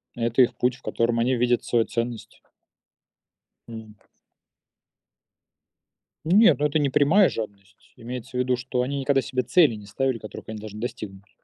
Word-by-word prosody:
Это 115 +2 +1
их 120 -1 +2
путь, 125 0 +1
в - - -20
котором 115 0 -1
они 125 +2 +1
видят 120 0 +1
свою 115 -2 +1
ценность. 115 -1 -5 1.3
Мгм. 110 -2 -10 2.3
Нет, 200 +3 +5
ну, 150 - +1
это 150 +1 +1
не 145 - +1
прямая 165 +9 +4
жадность. 100 -3 -9
Имеется 125 +2 -7
в - - 0
виду, 125 0 +1
что 125 0 -2
они 140 +2 -3
никогда 135 0 +1
себе 130 +2 -2
цели 135 +1 +4
не 105 -1 -11
ставили, 130 +2 -1
которых 110 - -10
они 110 -1 -6
должны 105 0 -9
достигнуть. 100 -4 -7
120 Hz, 155 wpm, -24 LUFS, 110-130 Hz, 2.3 s, Нет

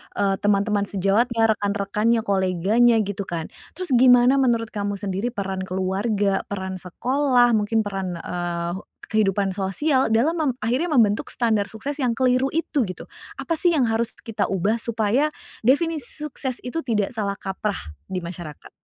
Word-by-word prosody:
eee, 195 -1 +1
teman-teman 205 0 +1
sejawatnya, 225 +4 +2
rekan-rekannya, 210 +2 0
koleganya, 195 +5 +3
gitu 200 0 -4
kan. 165 -2 -3 0.3
Terus 365 -6 -3
gimana 250 +2 +6
menurut 235 -4 +1
kamu 205 -1 -2
sendiri 195 +3 -2
peran 195 -4 -4
keluarga, 195 +2 0
peran 190 -2 -4
sekolah, 250 +6 +2
mungkin 220 +1 +2
peran, 195 -3 -3
eee, 170 0 -3 0.4
kehidupan 200 -2 +1
sosial 260 +9 +1
dalam 300 +10 +2
mem 300 -4 +1
akhirnya 250 +9 0
membentuk 215 -5 +2
standar 220 -4 +1
sukses 270 +8 -5
yang 255 -5 +1
keliru 255 0 +3
itu, 300 -6 0
gitu? 185 - -7 0.4
Apa 335 - -1
sih 350 - +3
yang 270 -6 +3
harus 225 +1 0
kita 225 -2 -2
ubah 195 +4 +1
supaya, 235 +6 +1 0.4
definisi 300 +2 +2 0.2
sukses 270 -4 -4
itu 325 +7 -3
tidak 210 -5 0
salah 205 -3 -1
kaprah 195 - -4 0.2
di 190 - -3
masyarakat? 170 -3 -8
215 Hz, 145 wpm, -23 LUFS, 195-245 Hz, 0.4 s, gimana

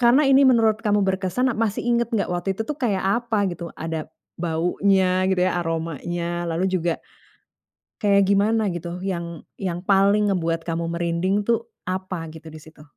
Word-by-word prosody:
Karena 250 +5 +5
ini 270 0 +6
menurut 225 -3 +3
kamu 210 -3 +2
berkesan, 190 +7 0
masih 220 -1 -1
inget 235 -1 +1
nggak 225 -6 -1
waktu 180 +2 -2
itu 220 - -2
tuh 300 +4 -4
kayak 205 -7 0 0.2
apa 220 -4 +1
gitu, 170 0 -6
ada 160 -1 -4 0.3
baunya 185 +3 +2
gitu 190 -1 +1
ya, 185 - +1
aromanya 170 +1 -3
lalu 165 +2 -1
juga, 175 -2 +1 1.1
kayak 200 -1 +3
gimana 210 +2 +3
gitu 175 0 -5
yang 170 -4 -4 0.2
yang 180 -3 -3
paling 200 +2 +3
ngebuat 165 -3 0
kamu 165 0 -1
merinding 175 +4 0
tuh 230 +2 0 0.2
apa 185 -3 -4
gitu 160 +1 -12
di 155 - -9
situ? 155 0 -16
185 Hz, 160 wpm, -23 LUFS, 170-210 Hz, 1.1 s, ini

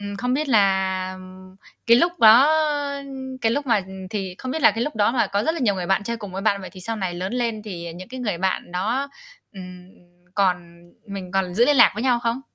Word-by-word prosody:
ừm, 200 0 -6
không 250 +4 -1
biết 300 +2 -1
là 200 -6 +4 1.1
cái 235 - +7
lúc 340 +8 +3
đó 230 +6 +8 0.9
cái 225 0 +1
lúc 285 +3 -2
mà, 235 -3 +3
ừm, 190 -1 -9
thì 190 -3 -4
không 260 - -5
biết 320 - -3
là - - +7
cái 230 +2 -2
lúc 295 - -5
đó 210 +2 +2
mà 235 -4 +1
có 200 +1 -1
rất 320 - +1
là 335 - -5
nhiều 215 -6 +2
người 180 -2 -4
bạn 195 +3 +1
chơi 235 +2 -3
cùng 205 -4 -9
với 195 +1 -5
bạn, 200 -2 +1
vậy 185 - -9
thì 185 - -12
sau 225 +5 -4
này 190 -4 -3
lớn 185 +4 -4
lên 235 -3 -2
thì 170 -5 -7
những 185 +2 -10
cái 255 +1 -8
người 205 -8 -2
bạn 185 -1 -2
đó, 230 +10 -1 0.4
ừm, 180 -2 -11 0.5
còn 175 -3 -1 0.2
mình 195 -3 -7
còn 190 -2 -1
giữ 235 +5 +4
liên 290 +2 +3
lạc 240 - +7
với 215 - -4
nhau 250 -2 +2
không? 235 +1 -1
205 Hz, 245 wpm, -22 LUFS, 185-240 Hz, 1.1 s, đó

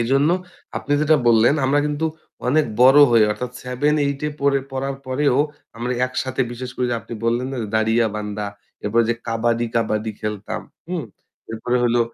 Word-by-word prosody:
এজন্য 135 +6 +3 0.5
আপনি 145 - -3
যেটা 155 +1 +4
বললেন, 115 +4 +5
আমরা 140 +2 +3
কিন্তু 150 +2 -1 0.4
অনেক 150 +4 +3 0.2
বড় 135 +3 +8
হয়ে, 115 -2 +6
অর্থাৎ 125 +4 -5
7-8 140 +2 0
এ - - 0
পড়ে 140 -1 +3
পড়ার 135 +1 -2
পরেও 130 0 +1 0.4
আমরা 120 +2 -2
একসাথে 130 +1 -3
বিশেষ 125 +1 -6
করে 125 - 0
যে - - +1
আপনি 115 - -8
বললেন 120 +2 +1
না - - -4
যে, - - -3
"দাড়িয়াবান্ধা।" 105 -2 0 0.4
এরপরে 115 +3 +2
ওইযে 120 +1 0
কাবাডি, 115 +1 +1
কাবাডি 110 -1 0
খেলতাম। 105 -1 -4 0.3
হুম? 175 -6 -2 0.5
এরপরে 115 +2 -1
হলো 120 0 +3
125 Hz, 165 wpm, -21 LUFS, 115-140 Hz, 0.5 s, বড়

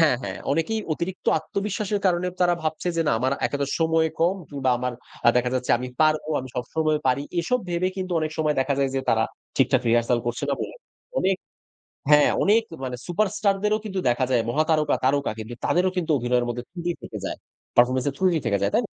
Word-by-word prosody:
হ্যাঁ, 150 -6 +5
হ্যাঁ, - - -5
অনেকেই 215 +9 0
অতিরিক্ত 180 +4 -4
আত্মবিশ্বাসের 200 +4 -2
কারণে 180 0 +2
তারা 175 -1 +4
ভাবছে 160 +3 -2
যে, 165 - +3
"না, - - +3
আমার 130 +3 +1
একে 145 - -3
তো 140 - 0
সময় 160 0 +3
কম 175 +4 +3
কিংবা 135 -3 -1
আমার 125 0 -2 0.3
আ - - +9
দেখা 125 0 +2
যাচ্ছে, 125 -1 -1
আমি 125 0 -5
পারবো 155 0 +3
আমি 130 - -8
সবসময় 155 +4 0
পারি।" 130 +2 +2 0.2
এসব 250 +9 +1
ভেবে 175 +2 +1
কিন্তু 185 -1 -3
অনেক 155 0 -1
সময় 155 -1 +2
দেখা 140 +1 +1
যায় 135 -1 +1
যে, 135 - +1
তারা 110 0 +3 0.3
ঠিকঠাক 130 -1 +3
রিহার্সাল 120 +1 +3
করছে 120 0 -2
না - - +2
বলে। - - -5 0.4
অনেক 190 0 +2 0.7
হ্যাঁ, 150 0 +7
অনেক 220 +3 +4 0.2
মানে 125 -1 -3
সুপার 195 +4 +1
স্টার 200 -2 +2
দেরও 210 0 +2
কিন্তু 195 -3 -2
দেখা 120 +2 +2
যায়, 120 -3 +3
মহাতারকা, 155 +2 +2
তারকা 140 +1 +2
কিন্তু 110 +2 -6
তাদেরও 185 +1 +2
কিন্তু 170 -3 -1
অভিনয়ের 125 0 +1
মধ্যে 120 +1 -4
ত্রুটি 175 -1 -3
থেকে - - -7
যায়। - - -4 0.4
পারফরম্যান্স 125 +2 +4
এর - - -13
ত্রুটি 180 -4 +3
থেকে 100 -3 +2
যায়, - - +2
তাই - - +4
না? - - -3
155 Hz, 210 wpm, -24 LUFS, 125-180 Hz, 0.7 s, আ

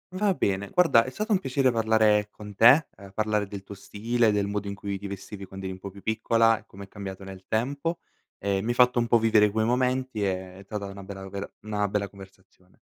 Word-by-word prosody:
Va 195 -1 +2
bene. 100 0 -1
Guarda, 165 -10 +4
è 130 - -4
stato 215 - -4
un 195 - +4
piacere 135 -4 +1
parlare 110 -2 +3
con 105 -1 -11
te, 125 +9 +7
ehm, 100 -1 -12
parlare 105 -2 0
del 100 -1 -8
tuo 100 - -9
stile, 110 +3 0
del 100 -1 +1
modo 100 0 -3
in 100 - -4
cui 100 0 -5
ti 100 - -6
vestivi 100 0 -8
quando 95 0 -9
eri 95 - -3
un 95 - -11
po' 100 - -7
più 100 +1 -14
piccola 115 0 +2
e - - -21
come 100 +1 -11
è - - -11
cambiato 100 -1 -8
nel 95 -1 -10
tempo, 140 +9 -1 0.4
e 100 -1 -1
mi 110 - -4
hai - - +2
fatto 125 0 +4
un 120 - +1
po' 120 - +5
vivere 110 -2 +4
quei 110 +1 0
momenti. 125 -2 0
Ehm, 95 -1 -3
è 100 - -13
tata 105 -1 -4
una 100 0 -8
bella 95 0 -8
vera 100 +1 -6
una 105 -1 -1
bella 100 0 -1
conversazione. 95 -2 -17
105 Hz, 235 wpm, -26 LUFS, 100-115 Hz, 0.4 s, te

